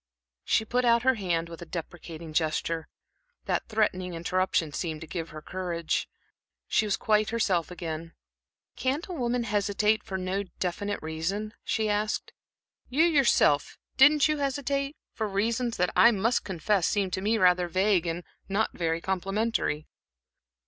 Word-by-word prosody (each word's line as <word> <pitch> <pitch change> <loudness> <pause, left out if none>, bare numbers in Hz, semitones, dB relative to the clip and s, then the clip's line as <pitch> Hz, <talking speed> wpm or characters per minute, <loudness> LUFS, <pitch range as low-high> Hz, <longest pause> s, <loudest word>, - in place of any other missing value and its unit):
She 220 - +2
put 245 +3 +1
out 235 -1 +4
her 260 0 +5
hand 175 -7 -1
with 165 0 -10
a - - -6
deprecating 165 -1 -7
gesture. 160 +1 -1 0.6
That - - -1
threatening 185 -5 0
interruption 170 -2 0
seemed 160 -2 -3
to - - -6
give 165 0 -5
her 155 0 -9
courage. 175 -3 -2 0.6
She 215 - +2
was 205 - +1
quite 215 0 +2
herself 195 -7 +1
again. 165 -2 -6 0.6
"Can't 270 +5 -1
a - - -4
woman 245 -5 0
hesitate 210 0 +1
for 190 - -4
no 190 +1 -1 0.2
definite 200 +3 -2
reason?" 180 +7 -3
she 220 -1 0
asked. 210 +1 -1 0.6
"You, 280 +5 +3
yourself 270 - +3 0.2
didn't 290 +3 +6
you 305 0 0
hesitate 275 0 -1 0.2
for 220 - -2
reasons 225 +4 0
that 180 0 +1
I 235 - +8
must 230 +2 +1
confess 190 0 0
seem 200 -3 0
to 185 - -2
me 215 +3 +2
rather 180 -2 +4
vague 185 0 +2
and 165 +1 -3 0.3
not 205 +3 0
very 165 -1 -1
complimentary." 190 -4 -1
195 Hz, 150 wpm, -28 LUFS, 170-225 Hz, 0.6 s, I